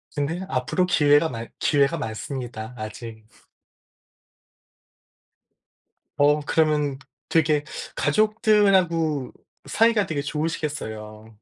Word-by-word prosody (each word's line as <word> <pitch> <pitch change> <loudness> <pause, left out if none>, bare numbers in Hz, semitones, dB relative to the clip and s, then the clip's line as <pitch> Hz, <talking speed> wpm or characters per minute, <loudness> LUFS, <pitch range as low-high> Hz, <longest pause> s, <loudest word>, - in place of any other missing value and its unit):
근데 155 +5 -2
앞으로 135 +8 0
기회가 150 -2 +4
많 115 -1 -6
기회가 145 +2 +2
많습니다 115 0 -6
아직. 110 +1 -8 2.9
어. 145 +1 +4
그러면은 150 -3 +1 0.3
되게 155 -2 +2 0.3
가족들하고 185 - +2 0.3
사이가 225 -3 +3
되게 155 -5 -3
좋으시겠어요. 110 -9 -5
145 Hz, 215 characters per minute, -24 LUFS, 125-165 Hz, 2.9 s, 기회가